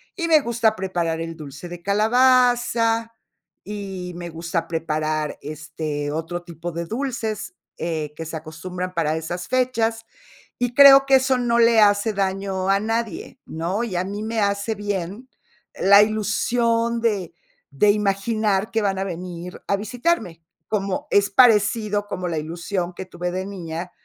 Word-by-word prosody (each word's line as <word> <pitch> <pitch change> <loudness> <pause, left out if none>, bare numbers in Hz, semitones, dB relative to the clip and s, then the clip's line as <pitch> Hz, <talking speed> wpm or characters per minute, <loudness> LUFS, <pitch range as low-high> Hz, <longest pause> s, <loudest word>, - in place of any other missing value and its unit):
Y 335 -3 -2
me 315 -2 +5
gusta 235 -3 +1
preparar 175 -4 -2
el 165 0 -5
dulce 150 +2 -9
de 175 0 -8
calabaza, 230 +1 +3 0.5
y 195 -3 -6
me 175 0 -6
gusta 165 0 -3
preparar, 155 -2 -2
este, 155 -1 -4
otro 165 +3 -4
tipo 170 0 -7
de 170 +1 -4
dulces, 230 - -4 0.2
eh, 155 -3 -3
que 165 - -6
se 160 0 -5
acostumbran 180 +4 -6
para 160 -3 0
esas 175 +3 -5
fechas, 230 -3 0 0.5
y 245 0 -1
creo 275 0 +9
que 270 - +6
eso 260 0 +3
no 240 -1 +1
le 230 -1 +5
hace 205 +1 +3
daño 195 -1 -1
a 195 0 +4
nadie, 225 -2 -3
¿no? 175 +7 -2
Y 220 -6 -4
a 175 - +1
mí 200 +3 -5
me 225 +1 -2
hace 200 +2 0
bien 205 +3 -4 0.5
la 200 +1 +7
ilusión 230 +2 0
de 205 -7 -1 0.4
de 205 +10 +4
imaginar 210 0 0
que 225 - +1
van 195 -2 0
a - - 0
venir 180 -1 -7
a 200 - +2
visitarme, 220 - -2 0.3
como 205 +7 -2
es 200 0 +4
parecido 210 -2 +3
como 180 -2 -4
la 165 -3 -1
ilusión 175 +3 -4
que 190 - -7
tuve 180 -1 -4
de 185 +1 -3
niña 180 -2 -6
195 Hz, 155 wpm, -22 LUFS, 170-225 Hz, 0.5 s, creo